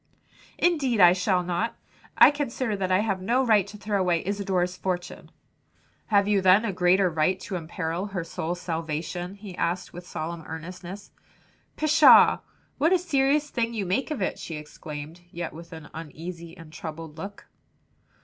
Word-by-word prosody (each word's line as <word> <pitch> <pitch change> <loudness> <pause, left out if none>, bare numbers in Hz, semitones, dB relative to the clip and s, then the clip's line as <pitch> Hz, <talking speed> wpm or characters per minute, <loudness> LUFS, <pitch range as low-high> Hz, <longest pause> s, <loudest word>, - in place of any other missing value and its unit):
"Indeed 280 -10 +2
I 175 -2 +8
shall 185 0 +1
not; 180 +6 -2 0.4
I - - +9
consider 255 -6 -2
that 190 -2 -2
I 185 +2 +4
have 195 -4 -1
no 245 +7 +1
right 215 -5 +4
to 210 - -10
throw 205 -1 -1
away 175 -2 +1
Isadore's 190 -2 -1
fortune." 180 -1 -4 0.8
"Have 200 -2 +3
you 205 -2 +3
then 190 +4 +5
a 205 - -1
greater 180 +2 +3
right 170 +3 +1
to 190 - -5
imperil 170 +2 -3
her 195 -4 -4
soul's 170 +1 -4
salvation?" 165 +2 -4
he 200 -3 -10
asked 175 +2 -2
with 175 +1 -10
solemn 165 0 -5
earnestness. 180 +4 -8 0.7
"Pshaw! 310 0 +7 0.4
what 315 +5 +3
a 375 - +6
serious 295 -3 +1
thing 235 -1 -1
you 205 -3 -2
make 190 - -1
of 295 -10 -2
it," - - -2
she 165 - -6
exclaimed, 150 +2 -8
yet 170 -1 -5
with 170 +2 -11
an 160 -3 -9
uneasy 165 +2 -8
and 165 -2 -13
troubled 160 -1 -8
look. 200 +3 -8
185 Hz, 165 wpm, -26 LUFS, 170-210 Hz, 0.8 s, I